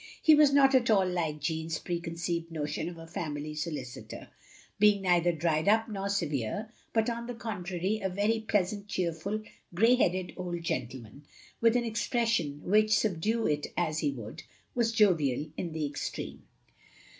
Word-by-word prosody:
He 315 - +6
was 300 -2 +6
not 275 -1 +5
at 250 -3 +4
all 195 -4 +4
like 165 -4 -1
Jeanne's 160 +1 -2
preconceived 170 0 -3
notion 150 +1 -3
of 175 - -10
a 165 - -9
family 155 -2 -4
solicitor; 150 -5 -6 0.5
being 205 -1 +5
neither 175 -1 +3
dried 160 0 0
up 220 +2 +4
nor 200 -2 -3
severe, 170 - -2 0.2
but 225 -1 +2
on 235 0 -3
the 245 - -5
contrary, 195 -2 -3
a 190 - 0
very 205 +4 +1
pleasant, 205 -1 -1
cheerful, 185 +3 -2 0.3
grey 225 +7 +5
headed 185 -7 +1
old 175 -2 -4
gentleman; 130 -2 -4 0.4
with 230 0 +4
an 245 - +2
expression 225 - 0
which, 215 +2 +4
subdue 220 +4 0
it 150 0 0
as 155 -3 0
he 150 - +1
would, 115 -5 -7 0.3
was 235 -2 +1
jovial 165 - +3
in 170 - -4
the 155 -1 -2
extreme. 145 0 -5
180 Hz, 155 wpm, -30 LUFS, 160-215 Hz, 0.5 s, He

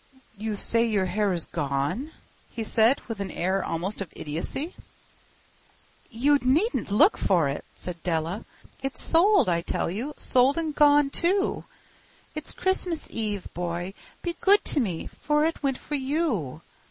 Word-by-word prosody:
"You 215 +1 -3
say 230 +3 +2
your 210 -5 +1
hair 200 +2 0
is 170 -3 -2
gone?" 145 - -2 0.4
he 230 - -4
said, 225 +4 +3
with 225 -3 -5
an 200 -1 -3
air 190 +3 -1
almost 185 +6 -3
of 190 - -5
idiocy. 170 - -4 1.4
"You 280 +4 +3
needn't 310 - +1
look 205 - +4
for 175 -6 +3
it," 140 +1 -3
said 175 -2 -7
Della. 170 +4 -1 0.4
"It's 270 0 -3
sold, 350 - +4
I 170 -1 +2
tell 170 - -2
you—sold 260 - +2
and 320 -2 -1
gone, 290 -1 +5
too. 385 +5 +1 0.7
It's 305 0 -5
Christmas 365 -3 -1
Eve, 210 -4 -3
boy. 175 +1 -3 0.3
Be 345 -1 -2
good 405 +1 +5
to - - +2
me, 185 -10 -2
for 300 0 +2
it 325 - -2
went 270 -3 0
for - - -8
you. 260 - -1
225 Hz, 150 wpm, -26 LUFS, 180-295 Hz, 1.4 s, gone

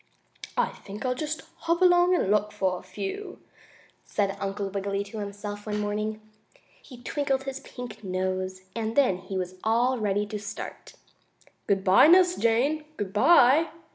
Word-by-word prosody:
"I - - +2
think 205 +4 -9
I'll 250 - +1
just 305 +4 -4
hop 335 +1 0
along 355 0 +5
and 200 - +1
look 210 0 +2
for 185 -3 -1
a - - -13
few," 195 - -6 0.6
said 200 -2 -1
Uncle 195 0 -3
Wiggily 200 0 -2
to 205 +2 -8
himself 205 +1 -6
one 210 0 -1
morning. 210 +1 -2 0.6
He 245 -2 -14
twinkled 270 0 -1
his 270 0 -5
pink 245 -5 -9
nose, 185 0 -2
and 225 -1 -2
then 255 -10 +4
he 190 +1 -5
was 185 0 -4
all 240 +3 +2
ready 205 -1 0
to 210 0 -5
start. 205 0 -8 0.7
"Good 195 -1 +1
bye, 195 +9 +7
Nurse 360 +1 +6
Jane! 255 +7 +1
Good 195 -2 -4
bye!" 290 +5 +6
210 Hz, 160 wpm, -27 LUFS, 195-265 Hz, 0.7 s, bye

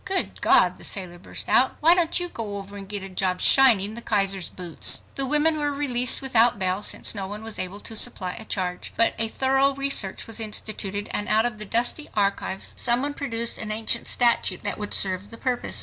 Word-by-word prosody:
"Good 380 0 -2
God!" - - +4
the - - -13
sailor 180 -3 -5
burst - - -7
out. 260 - +3
"Why 330 +3 +5
don't 350 -1 +2
you 355 - -3
go 215 -10 -7
over 200 0 -10
and 195 -1 -9
get 205 -2 -4
a 195 - -7
job 185 -1 -1
shining 220 -7 +5
the 235 - -6
Kaiser's 195 -4 0
boots?" 175 -3 +1
The 270 -1 +2
women 300 +2 +1
were 290 -1 -1
released 260 -3 +2
without 240 -3 +3
bail, 185 0 -1
since - - +2
no 195 -3 -3
one 210 +2 -7
was 225 -1 -6
able 185 +2 -5
to 225 - -4
supply 195 -5 +4
a - - -9
charge. 180 -4 -4
But 230 - +3
a 225 - +2
thorough 270 +3 0
research 275 -8 0
was 225 0 -5
instituted 210 -2 -2
and 205 - -3
out 220 +2 +2
of 225 -3 -4
the 215 - -1
dusty 240 +8 0
archives 200 -1 -1
some 240 +1 +1
one 285 0 -1
produced 235 -5 -2
an 215 -1 -5
ancient 225 +2 0
statute 235 -6 +1
that 205 - -3
would 210 -1 -2
serve 190 +1 0
the 230 - -9
purpose. 250 0 -3
220 Hz, 215 wpm, -23 LUFS, 195-255 Hz, -, Why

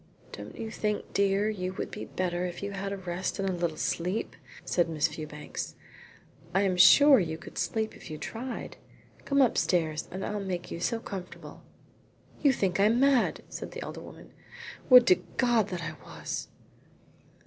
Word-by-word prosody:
"Don't 105 +1 -9
you 220 -1 -5
think, 210 -1 -2
dear, 200 +1 +2
you 185 -4 -2
would 190 - -5
be 210 - -6
better 180 -1 -2
if 180 +1 -5
you 200 - -3
had 195 0 -4
a 200 - -3
rest 180 0 -3
and 195 - -1
a 190 - 0
little 170 -3 -2
sleep?" 180 +6 -2 0.3
said 175 -2 +1
Miss 155 -1 +1
Fewbanks. 150 -1 -6 0.8
"I 195 - +4
am 190 -2 +1
sure 280 +9 +8
you 160 -4 -2
could - - -9
sleep 220 +6 -1
if - - -12
you 155 - -5
tried. 240 - -6 0.5
Come 280 -1 +4
upstairs 165 -9 +1
and 190 +1 -5
I'll 210 - -2
make 180 -2 -4
you - - -4
so 230 +6 0
comfortable." 190 -5 -8 0.8
"You 285 - +5
think 195 -7 0
I 200 - +5
am 230 +3 +3
mad," 275 -2 +3
said - - -7
the - - -6
elder - - -7
woman. - - -12 0.6
"Would 250 -2 +10
to 185 -7 +4 0.2
God 240 -5 +3
that 180 -3 -5
I 155 -1 -4
was." - - -5
190 Hz, 180 wpm, -29 LUFS, 175-220 Hz, 0.8 s, Would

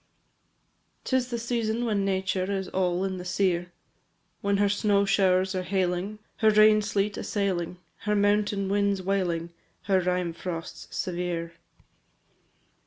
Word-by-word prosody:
IV. - - -44
'Tis 260 -1 0
the 240 - -2
season 235 0 -1
when 210 -3 +1
nature 190 -1 0
Is 190 -1 -2
all 180 -1 0
in 190 -1 -2
the 180 - -6
sere, 180 -1 0 0.7
When 200 0 +1
her 205 0 +3
snow 205 0 +2
showers 190 -1 +3
are 185 - -1
hailing, 185 +2 -1 0.2
Her 220 - +4
rain 215 0 +6
sleet 205 0 -1
assailing, 180 -4 -2 0.2
Her 210 0 -1
mountain 205 -1 +2
winds 200 -1 +1
wailing, 175 -3 -1 0.3
Her 195 -2 +3
rime 180 -1 0
frosts 170 -1 -6
severe. 175 -2 -3
195 Hz, 135 wpm, -27 LUFS, 180-205 Hz, 0.7 s, rain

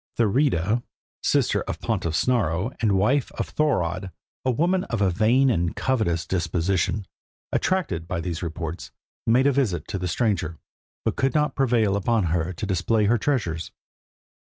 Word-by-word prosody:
Thurida, 115 - +2 0.4
sister - - +2
of - - -4
the - - -11
pontiff 80 -1 -1
Snorro, 100 -2 +1
and 110 -3 +3
wife 120 +8 +2
of - - -3
Thorodd, 95 - 0 0.3
a 130 - +1
woman 175 +9 +2
of 115 - -3
a 100 -2 +3
vain 120 +8 +3
and 85 -6 0
covetous 110 -11 0
disposition, 90 +2 0 0.5
attracted 165 - 0
by 90 - -2
these 85 -1 -3
reports, 85 -1 -5 0.4
made 125 +4 +4
a 140 - +5
visit 110 - 0
to 100 - -2
the 90 - -2
stranger, 90 -5 0 0.5
but - - 0
could 135 +2 +1
not 150 0 +2
prevail 115 -7 +2
upon 110 +2 +1
her 85 +1 0
to 95 +4 -5
display 105 +3 +1
her 115 +3 +3
treasures. 95 - -1
100 Hz, 155 wpm, -24 LUFS, 85-125 Hz, 0.5 s, a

